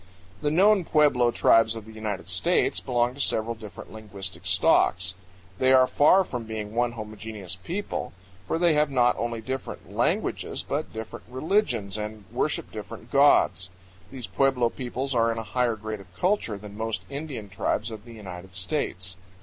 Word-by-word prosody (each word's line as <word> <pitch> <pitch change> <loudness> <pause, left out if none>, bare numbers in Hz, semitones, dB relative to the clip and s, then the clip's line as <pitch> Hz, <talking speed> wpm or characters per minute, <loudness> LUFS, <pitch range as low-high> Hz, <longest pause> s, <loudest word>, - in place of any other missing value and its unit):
The 145 - +1
known 195 +5 +5
pueblo 145 -7 +4
tribes 115 -1 +4
of 110 -2 -7
the 110 - -11
United 105 -4 -4
States - - +2
belong 120 0 0
to 140 - -5
several 115 -2 +1
different 110 -2 -11
linguistic 95 -5 -4
stocks. 90 0 +3 0.5
They 130 0 +5
are 130 -1 +7
far 150 +9 +5
from 125 -9 -5
being 110 -1 -5
one 120 0 +1
homogeneous 105 -4 -5
people, 195 - -4 0.4
for - - 0
they 170 -1 +4
have 150 -1 +3
not 125 -3 +3
only 115 -1 -2
different 130 +3 -6
languages - - 0
but - - -2
different 110 0 -7
religions 125 - 0
and 105 -1 -6
worship - - -1
different - - -9
gods. 90 0 +4 0.4
These 130 -3 -6
pueblo 135 -2 +2
peoples 130 +3 -3
are 115 -1 +3
in 115 - -3
a 115 - -3
higher 120 +3 0
grade 110 0 -5
of 95 -2 -15
culture 180 - 0
than 100 0 -10
most 110 0 -3
Indian 140 -7 -5
tribes 100 +4 -1
of 110 -2 -8
the 120 0 -12
United 95 -3 -9
States. 95 -3 -2
115 Hz, 165 wpm, -26 LUFS, 105-130 Hz, 0.5 s, are